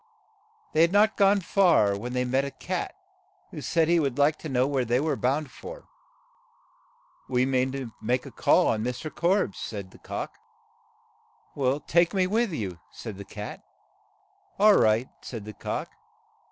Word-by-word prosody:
They 155 - +4
had 170 +1 +5
not 210 +2 +4
gone 200 0 +4
far 165 - +3
when 120 +5 -5
they 125 0 0
met 130 +2 +1
a 140 - -3
cat, 130 - -4 0.6
who - - -7
said 165 -2 +1
he 170 0 +4
would 140 -5 -1
like 145 +2 +4
to 155 - -6
know 130 -1 +2
where 135 -2 0
they 120 +1 +1
were 155 +2 0
bound 135 +2 -1
for. - - -10 1.4
"We 125 0 +2
mean 130 0 +1
to 135 -4 -5
make 125 +3 0
a - - -9
call - - +3
on 110 -1 +1
Mr. 125 +6 -4
Korbes," 175 - +1
said 100 -3 -6
the - - -17
cock. - - -5 1.5
"Take 170 +2 +3
me 185 -1 +3
with 220 +3 +1
you," 95 - -4
said 105 -4 -8
the 100 - -7
cat. 105 +1 -8 0.9
"All 210 +1 +7
right," 110 +4 +3
said 115 -5 -7
the 105 - -8
cock. - - -4
135 Hz, 165 wpm, -27 LUFS, 120-170 Hz, 1.5 s, All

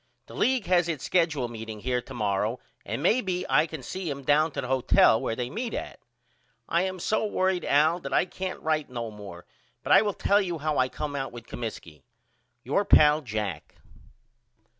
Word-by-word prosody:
The - - -14
league 255 -4 +1
has 175 -2 +2
its 155 -5 -3
skedule 160 -8 +1
meeting 110 -2 -8
here 125 +1 -1
to - - -11
morrow 105 +2 -1 0.2
and 140 - -4
may 225 +8 +3
be 180 -3 -2
I 155 +2 +3
can 155 -4 -8
see 185 +5 -5
him 140 -1 -5
down 150 +3 +3
to - - -3
the - - -5
hotel 125 -3 +4
where 115 - -2
they 125 0 -3
meet 230 - -4
at. - - -6 0.7
I 170 - +2
am 185 0 -2
so 215 +6 0
worried 185 -3 0
Al 155 +4 +3
that 140 - -7
I 135 - +3
can't 185 0 -5
write 155 -2 -1
no 120 -3 -5
more 100 -4 -10 0.4
but - - -3
I - - +8
will 205 -2 -1
tell 200 +1 +3
you 175 -4 -3
how 155 0 -1
I 130 0 +2
come 145 +1 -5
out 135 -1 -3
with 120 -1 -10
Comiskey. 100 - -7 0.6
Your 145 +10 +1
pal, 150 -5 +5
JACK. 105 - -5
150 Hz, 200 wpm, -27 LUFS, 120-180 Hz, 0.7 s, I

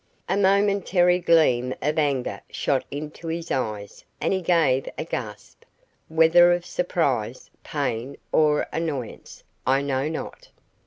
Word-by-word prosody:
A 190 - 0
momentary 195 -2 +3
gleam 130 -8 +3
of 150 +3 0
anger 140 -4 -1
shot 135 -2 -1
into 150 +3 -7
his 165 +1 -4
eyes 105 -5 -3 0.2
and - - 0
he 190 - -1
gave 160 -7 +2
a - - -2
gasp, - - -7 0.4
whether 165 +2 +5
of 175 0 -2
surprise, 140 -11 -2
pain, 120 +5 -3
or 150 -1 +3
annoyance, 150 -7 -5 0.2
I 135 +2 +3
know 140 +1 -1
not. 160 - -7
155 Hz, 125 wpm, -24 LUFS, 130-175 Hz, 0.4 s, whether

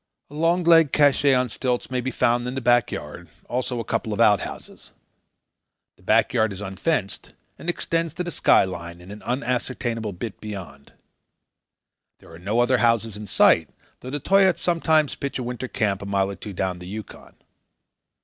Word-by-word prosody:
A - - -12
long 165 +4 +1
legged 165 -4 +5
cache 145 -1 +3
on 125 0 +1
stilts 125 +2 -3
may 125 -1 -1
be 130 - -2
found 120 -1 +1
in 125 - -4
the - - -1
back 120 -2 +3
yard; 80 +3 -7 0.2
also 125 0 -2
a - - -2
couple 110 0 -2
of 105 - -5
outhouses. 105 -4 0 1.0
The - - -26
back - - +2
yard 110 -1 +2
is 95 - -7
unfenced, 100 - -3 0.3
and 175 - -5
extends 165 -2 -2
to 180 - -2
the 175 - -5
skyline 85 - +1
and 90 +2 -12
an 105 - -10
unascertainable 120 -3 -2
bit 100 +4 -7
beyond. 90 -10 -9 1.2
There - - -18
are 80 - -12
no 105 +7 0
other 125 +1 +2
houses 115 -2 +1
in 105 0 -8
sight, - - +4 0.3
though 130 - -8
the 145 +2 -3
Toyaats 190 +3 +3
sometimes 160 -3 +2
pitch 140 - -4
a 130 - -4
winter 125 +1 -5
camp 105 -6 -1
a 100 - -6
mile 100 -1 0
or - - -7
two 100 +2 -8
down 90 -1 -2
the 90 - -10
Yukon. 105 +3 -9
120 Hz, 180 wpm, -23 LUFS, 100-135 Hz, 1.2 s, legged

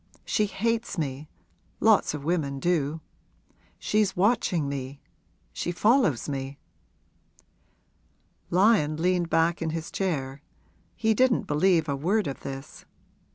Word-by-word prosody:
She 210 - +1
hates 230 +2 -2
me 145 -1 -4 0.5
lots - - +3
of 145 - -7
women 145 -4 -1
do. 160 -1 0 0.8
She's 210 -2 0
watching 185 -6 +1
me 140 0 -5 0.5
she 175 - -3
follows 210 - +2
me.' 135 -1 -4 1.9
Lyon 180 -5 +3
leaned 175 0 +1
back 165 +1 +2
in 165 - -1
his 160 0 -5
chair 140 -8 -2 0.5
he 220 -1 +2
didn't 255 0 +3
believe 160 +1 +2
a 140 - -1
word 190 +10 0
of 135 - -4
this. 135 0 -8
165 Hz, 115 wpm, -26 LUFS, 140-195 Hz, 1.9 s, lots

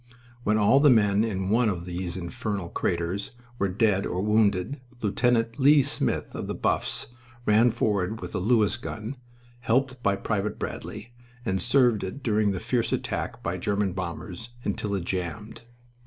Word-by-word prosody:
When 105 0 +2
all 110 +6 +5
the 145 0 +6
men 105 -4 +4
in 95 -4 -2
one 115 0 +4
of 90 -3 -3
these 90 0 -4
infernal 95 +1 -4
craters 90 +6 -2 0.3
were 100 - +2
dead 100 0 +2
or 90 - -2
wounded 105 +3 +2 0.2
Lieut. 115 +2 +1
Lea 140 +1 +6
Smith, 145 - -1
of - - -5
the - - -3
Buffs, - - -1 0.4
ran 110 +3 +5
forward 105 -1 0
with 90 - -7
a - - -1
Lewis 110 +2 +3
gun, 115 0 -6 0.4
helped 130 +2 0
by 100 -3 +2
Private 105 +1 -2
Bradley, 110 +3 -6 0.3
and 95 -1 0
served 120 -2 +3
it 95 +9 -6
during 105 -3 +2
a - - -3
fierce 120 +4 0
attack - - -3
by 85 +2 -2
German 100 +1 0
bombers 90 +4 -6 0.2
until 100 0 -1
it 90 -3 -3
jammed. 90 +4 -4
105 Hz, 160 wpm, -26 LUFS, 95-115 Hz, 0.4 s, the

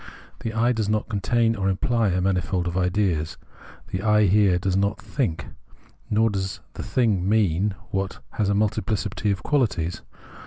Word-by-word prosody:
The 115 - -3
I 115 +2 +2
does 110 -4 -1
not 105 +1 0
contain 115 +2 +1
or 95 -2 0
imply 115 +4 +1
a 90 -1 +1
manifold 90 -1 0
of 85 - -3
ideas, 90 -4 0 0.5
the 95 - -3
I 105 0 +4
here 100 -1 +4
does 90 +1 -1
not 100 +1 +1
think: 115 - -2 0.6
nor 110 +1 +3
does 95 -1 -3
the - - -6
thing 105 -7 +1
mean 100 -2 +2 0.2
what 95 0 -2
has 105 -2 0
a 100 - +2
multiphcity 105 0 0
of 95 - -3
qualities. 95 - 0
100 Hz, 160 wpm, -24 LUFS, 95-110 Hz, 0.6 s, I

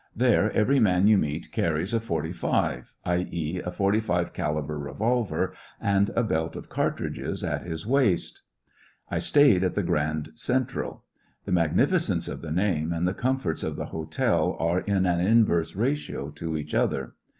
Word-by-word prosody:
There 120 -3 +3
every 135 +6 +3
man 95 -4 +4
yoti 105 -1 +6
meet 75 0 -3
carries 85 +5 0
a 115 - +3
^^ - - -9
forty 80 -6 -2
five," 85 - -1
i,e., 90 -1 -1
a - - -3
45 100 -1 0
caliber 75 -2 -2
revolver, 110 - -1 0.3
and 100 0 +2
a 120 - +3
belt 80 -6 -1
of - - -8
cartridges - - -2
at - - -1
his 80 0 -4
waist 125 -7 +1 0.7
''I - - 0
stayed 140 -11 +5
at 90 - 0
the 105 - +1
Grand 75 -1 -1
Central. 125 +9 -2 0.4
The - - -4
mag 85 -4 +2
nificence - - +2
of - - -6
the 80 - -7
name 85 -3 0
and 85 +1 0
the 90 - 0
comforts 125 -9 -1
of - - -3
the - - -4
hotel 80 -1 0
are 85 +2 +1
in 95 -1 0
an 85 -1 +2
inverse 95 -4 +3
ratio 120 - -2
to 80 +2 -4
each 75 0 -6
other. 65 -2 0
90 Hz, 170 wpm, -26 LUFS, 80-110 Hz, 0.7 s, yoti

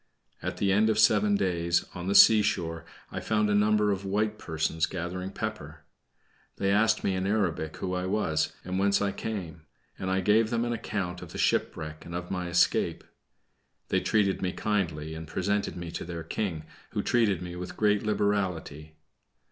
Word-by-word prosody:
At - - -4
the 100 - +1
end 105 +3 +4
of 110 - +1
seven 105 -1 +4
days, 85 -3 +1
on 90 0 -6
the 100 - +1
seashore 85 -7 +5 0.3
I - - -4
found 105 -1 +1
a - - +3
number 105 0 +3
of 100 0 -2
white 105 +2 -1
persons 80 0 -1
gathering 90 +1 -4
pepper. - - -6 0.7
They 100 0 0
asked 110 +2 +3
me 95 - +1
in 95 +1 -1
Arabic 90 -7 -1
who 90 - -3
I 90 0 -2
was, 80 -6 0
and 95 +1 -2
whence 100 0 +3
I 100 -1 0
came; 95 -6 -5 0.4
and 95 - -3
I 95 0 +1
gave 110 +3 +3
them 115 0 0
an 120 - -1
account 95 -6 -3
of - - -10
the - - -6
shipwreck, 80 0 -1
and 85 - -8
of 90 0 -5
my 90 -2 -2
escape. 90 0 +2 0.9
They - - +2
treated 100 -3 +1
me 90 -1 -1
kindly 80 -8 -2
and 80 0 -7
presented 100 +5 -1
me 85 -1 -6
to - - -5
their 85 -1 -6
King, 85 -2 -3 0.3
who - - -1
treated 105 -7 +2
me 90 0 -6
with 90 0 -7
great 105 -1 +3
liberality. 95 -8 -1
95 Hz, 180 wpm, -28 LUFS, 85-105 Hz, 0.9 s, seashore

